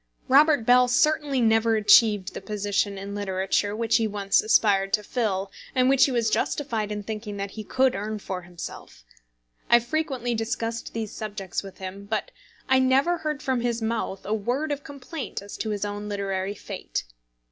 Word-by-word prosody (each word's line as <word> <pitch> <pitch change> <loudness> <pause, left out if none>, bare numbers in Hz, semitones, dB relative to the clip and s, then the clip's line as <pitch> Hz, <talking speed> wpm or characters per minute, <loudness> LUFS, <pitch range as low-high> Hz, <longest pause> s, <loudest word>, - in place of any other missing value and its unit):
Robert 285 -2 +5
Bell 250 +1 +6
certainly 295 +1 +2
never 225 0 +3
achieved 210 -2 +5
the - - -6
position 205 0 -1
in 200 +1 -6
literature 200 +1 -1
which 230 0 +2
he 225 - +1
once 200 -1 +2
aspired 200 -3 +3
to 210 - +2
fill, 200 -5 -2 0.2
and 255 0 +4
which 270 -1 +6
he 275 - -1
was 230 -3 +1
justified 225 -8 -1
in 210 0 -4
thinking 210 -1 -5
that 200 0 -4
he 215 - -7
could 260 +4 +2
earn 210 +2 -3
for 190 -3 -5
himself. 175 - -9 0.7
I - - +7
have 235 0 +3
frequently 260 -4 -1
discussed 225 0 -3
these 220 -2 -4
subjects 200 -4 -4
with 195 -1 -11
him, 190 +1 -7
but 215 +1 -3 0.4
I 265 -1 +4
never 270 +7 +3
heard 300 -2 -3
from 260 -2 0
his 235 -1 -1
mouth 220 -4 -3
a 210 - -1
word 245 +8 -1
of 290 0 -3
complaint 280 +1 -6
as 200 +1 -9
to 220 - -3
his 210 -1 -2
own 205 0 -5
literary 195 -1 -2
fate. - - -5
220 Hz, 180 wpm, -25 LUFS, 200-250 Hz, 0.7 s, I